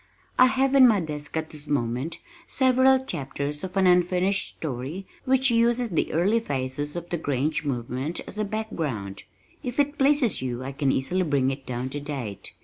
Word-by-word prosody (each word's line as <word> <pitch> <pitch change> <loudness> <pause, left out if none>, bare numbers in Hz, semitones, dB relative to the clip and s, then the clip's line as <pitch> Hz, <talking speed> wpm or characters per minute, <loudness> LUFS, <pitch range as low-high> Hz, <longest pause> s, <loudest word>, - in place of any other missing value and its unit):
I 255 - +9
have 265 +1 +1
in 265 -2 +8
my 215 -4 +4
desk 150 -2 -5
at 160 0 -3
this 150 -1 -6
moment, 130 +3 -1 0.3
several 260 0 +4
chapters 145 - -4
of 190 +1 -5
an 190 - +4
unfinished 180 +2 +2
story 150 +6 -5 0.2
which 265 0 +3
uses 235 +1 +3
the 165 - 0
early 195 +8 +2
phases 145 - -3
of 175 0 -6
the 175 - 0
Grange 145 +1 -1
movement 130 +3 -3
as 210 - -8
a - - +2
background. 160 - -4 0.4
If 245 +2 -4
it 290 +1 +1
pleases 275 -4 +3
you 125 -1 -3
I 135 - -4
can 135 0 0
easily 175 +9 0
bring 140 -6 +1
it 135 0 -7
down 125 +1 -3
to 145 - -4
date. 135 -8 -6
160 Hz, 180 wpm, -25 LUFS, 135-230 Hz, 0.4 s, I